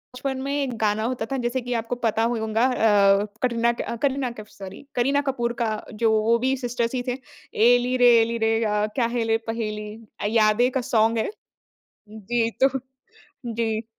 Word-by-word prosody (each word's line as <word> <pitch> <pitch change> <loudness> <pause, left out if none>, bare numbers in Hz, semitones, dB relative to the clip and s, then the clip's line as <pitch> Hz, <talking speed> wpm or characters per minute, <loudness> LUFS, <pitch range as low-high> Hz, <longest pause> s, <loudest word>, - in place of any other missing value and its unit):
बचपन 265 +1 -3
में 275 +1 -3
एक 275 -5 -2
गाना 215 0 0
होता 240 -1 -2
था, 270 - 0
जैसे 245 +1 -1
कि 245 0 -4
आपको 230 +1 -2
पता 225 -2 0
होगा 225 0 0
अ, 205 -5 +4 0.2
कटरीना 235 -1 +2
कै - - -5
अ, - - -4
करीना 265 0 -1
कैफ़, 215 -2 -11
सॉरी, 195 +5 -11
करीना 275 +4 +2
कपूर 240 -3 -1
का, 225 -2 +1 0.2
जो 220 +1 +1
वो 230 +2 +3
भी 265 +1 +2
सिस्टर्स 245 -1 -2
ही 250 - -1
थे, 250 0 -1 0.4
"एली 245 +2 +3
रे, 245 -1 +6
एली 230 +1 -1
रे, 225 0 +1
अ, 210 -1 +1
क्या 245 - +2
है 235 - +1
ले 225 0 +2
पहेली" 215 -2 -4 0.3
अ, - - -3
यादें 220 +2 +3
का 265 - -1
सॉन्ग 225 0 +3
है। 220 - 0 0.8
जी, 225 +2 -1
तो 270 0 +3 0.7
जी। 225 -1 -2
235 Hz, 190 wpm, -24 LUFS, 220-245 Hz, 0.8 s, रे